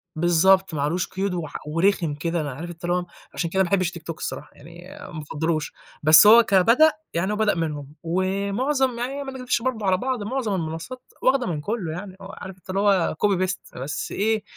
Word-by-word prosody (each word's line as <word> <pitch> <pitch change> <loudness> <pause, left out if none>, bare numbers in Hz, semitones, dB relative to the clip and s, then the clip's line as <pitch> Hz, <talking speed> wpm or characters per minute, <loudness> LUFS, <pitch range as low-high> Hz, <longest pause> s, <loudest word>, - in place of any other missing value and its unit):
بالضبط. 175 +3 +3
ما 145 - -2
عليهوش 170 +5 0
قيود 190 0 -2
وح 170 -4 -5
ورخم 165 -1 +1
كده. 165 +2 -2
أنا 145 -2 -4
عارف 165 +7 -7
أنت 170 0 -11
اللي 175 +1 +1
هو، 180 0 -1 0.3
عشان 170 - -2
كده 190 +3 +2
ما 175 - -3
باحبش 185 -2 +1
الTikTok 165 -1 -7
الصراحة، - - -6
يعني 170 +2 -14 0.3
ما 155 - -5
أفضّلهوش. 155 +1 -2 0.3
بس 155 +6 +8
هو 230 +2 +9
كبدأ، 230 +11 +5 0.2
يعني 170 +4 0
هو - - 0
بدأ 210 0 +2
منهم 150 -3 -4
ومعظم 200 - 0
يعني 270 +4 -3
ما 270 - -6
نكدبش 250 -2 -1
برضه 235 -4 -2
على 185 -1 +3
بعض، 250 +1 -2
معظم 225 -2 -2
المنصّات 165 +9 -5 0.2
واخدة 260 -2 +2
من 155 -4 -2
كُلّه 200 -2 -3
يعني 185 +3 -7
آه. 195 0 -9
عارف 190 0 -9
أنت 185 - -25
اللي 190 +1 -1
هو 195 -6 +2
copy، 190 -2 +2
paste 190 - -7
بس 145 +3 -4
إيه، 215 +1 0
185 Hz, 205 wpm, -23 LUFS, 165-210 Hz, 0.3 s, هو